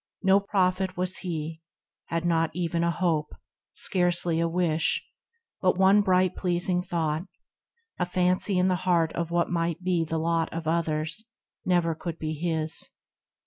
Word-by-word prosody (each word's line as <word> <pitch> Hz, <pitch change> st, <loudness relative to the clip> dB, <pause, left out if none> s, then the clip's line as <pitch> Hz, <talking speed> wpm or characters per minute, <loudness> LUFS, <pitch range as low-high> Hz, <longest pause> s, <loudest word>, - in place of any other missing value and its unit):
" -, -, -66 dB
No 195 Hz, +1 st, +5 dB
Prophet 190 Hz, -2 st, 0 dB
was 185 Hz, +1 st, -1 dB
he, 160 Hz, -2 st, -4 dB, 0.4 s
had 165 Hz, 0 st, -2 dB
not 165 Hz, -1 st, +2 dB
even 170 Hz, -1 st, -1 dB
a 170 Hz, -, +2 dB
hope, 170 Hz, -3 st, -1 dB, 0.4 s
Scarcely 175 Hz, -2 st, +1 dB
a 170 Hz, -, +2 dB
wish, 165 Hz, -2 st, 0 dB, 0.6 s
but 185 Hz, -1 st, +2 dB
one 195 Hz, +2 st, +5 dB
bright 185 Hz, -2 st, +2 dB
pleasing 180 Hz, 0 st, +1 dB
thought, 170 Hz, -1 st, -2 dB, 0.7 s
A 180 Hz, -, 0 dB
fancy 180 Hz, +2 st, +1 dB
in 180 Hz, +1 st, +3 dB
the 185 Hz, -1 st, +2 dB
heart 165 Hz, -2 st, +3 dB
of 170 Hz, -1 st, -2 dB
what 170 Hz, 0 st, 0 dB
might 170 Hz, 0 st, -1 dB
be 180 Hz, -2 st, +1 dB
The 160 Hz, 0 st, -3 dB
lot 165 Hz, 0 st, 0 dB
of 165 Hz, -1 st, -5 dB
others, 160 Hz, +4 st, -1 dB, 0.4 s
never 175 Hz, -2 st, +2 dB
could 165 Hz, +1 st, -6 dB
be 155 Hz, -1 st, -3 dB
his. 160 Hz, -1 st, -2 dB
170 Hz, 155 wpm, -27 LUFS, 165-180 Hz, 0.7 s, No